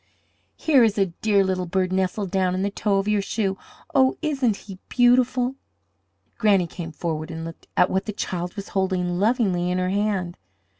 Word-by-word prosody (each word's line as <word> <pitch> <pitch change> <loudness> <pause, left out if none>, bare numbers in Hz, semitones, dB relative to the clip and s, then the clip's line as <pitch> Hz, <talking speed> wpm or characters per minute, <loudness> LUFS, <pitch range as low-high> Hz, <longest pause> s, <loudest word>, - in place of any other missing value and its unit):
Here 280 -6 +4
is 215 -2 +2
a 195 -4 +1
dear 205 -2 +3
little 185 -1 -1
bird 185 +1 0
nestled 190 +1 -1
down 185 -1 +1
in 185 - -1
the 200 - -1
toe 200 0 0
of 195 +1 -1
your 210 -1 +2
shoe! 195 -1 -2 0.3
Oh, 265 -2 +4
isn't 270 -8 +1
he 195 -3 -9
beautiful?" 250 +1 +3 0.8
Granny 200 -5 +4
came 165 0 -7
forward 155 0 -4
and 165 -1 -6
looked 165 0 -10
at - - +4
what 190 0 0
the 215 - -3
child 180 -2 -4
was 200 -1 -7
holding 185 -2 -1
lovingly 200 -5 +1
in 180 - 0
her 185 0 0
hand. 195 -3 -1
195 Hz, 185 wpm, -24 LUFS, 180-215 Hz, 0.8 s, Here